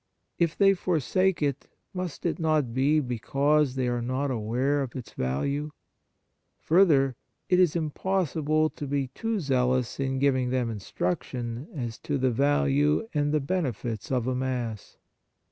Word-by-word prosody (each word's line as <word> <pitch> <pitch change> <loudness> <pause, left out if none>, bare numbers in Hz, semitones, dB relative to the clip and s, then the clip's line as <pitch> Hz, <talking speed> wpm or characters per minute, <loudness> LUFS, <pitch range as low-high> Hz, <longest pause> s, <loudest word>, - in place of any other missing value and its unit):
If 170 -2 +1
they 195 -1 +6
for 180 -3 0
sake 185 +4 +1
it, 140 -1 -1 0.3
must 180 -4 -5
it 170 - 0
not 155 -7 +1
be 140 +5 +3
because 140 +3 +1
they 130 -1 0
are 120 -1 -1
not 130 +3 -1
aware 125 +5 0
of 130 -4 -5
its 125 -4 -7
value? 140 - -1 0.9
Further, 150 -7 +4 0.3
it 180 - +4
is 175 -3 +4
impossible 155 -2 0
to 145 - -6
be 140 -1 -1
too 225 - -2
zealous 130 -5 0
in 135 -1 -1
giving 130 -2 +2
them 125 -2 0
instruction 115 - -3
as 120 -5 -4
to 145 - -2
the 130 -1 +1
value 145 - +2
and 145 -1 +1
the 155 - +2
benefits 130 - -3
of 125 -3 +1
a 130 - 0
Mass. 125 -4 -3
140 Hz, 150 wpm, -27 LUFS, 125-155 Hz, 0.9 s, they